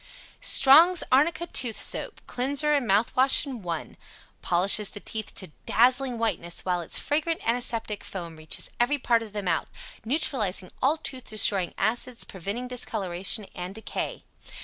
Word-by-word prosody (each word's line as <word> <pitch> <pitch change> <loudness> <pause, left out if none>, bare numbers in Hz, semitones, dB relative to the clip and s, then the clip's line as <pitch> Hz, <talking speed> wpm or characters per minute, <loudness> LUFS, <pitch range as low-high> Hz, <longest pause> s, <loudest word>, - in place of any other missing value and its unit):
] - - -28 0.2
Strong's 320 +5 +6
Arnica 315 +5 +3
Tooth 245 -9 0
Soap - - +1
Cleanser 285 +4 +1
and 280 -5 0
Mouth 205 +4 +1
Wash 265 +3 +4
In 260 -5 -7
One 170 -3 -6 0.4
Polishes 195 +4 +3
the - - -9
teeth 215 +1 -3
to 185 -5 -5 0.2
dazzling 250 +1 +2
whiteness, 195 -7 -2
while 180 -1 0
its 165 - -3
fragrant 315 +1 -1
antiseptic 230 -3 -1
foam 170 -4 -7
reaches 155 0 -3
every 260 +5 +2
part 235 -3 +1
of 220 -2 -8
the 205 -1 -4
mouth 170 -3 -1 0.3
neutralizing 220 - -1
all 290 +5 +2
tooth 260 -5 -6
destroying 200 -4 +2
acids, 235 +4 -1
preventing 200 +7 -5
discoloration 205 -4 0
and 180 +1 -7
decay. 220 - -5
230 Hz, 150 wpm, -26 LUFS, 195-265 Hz, 0.4 s, Strong's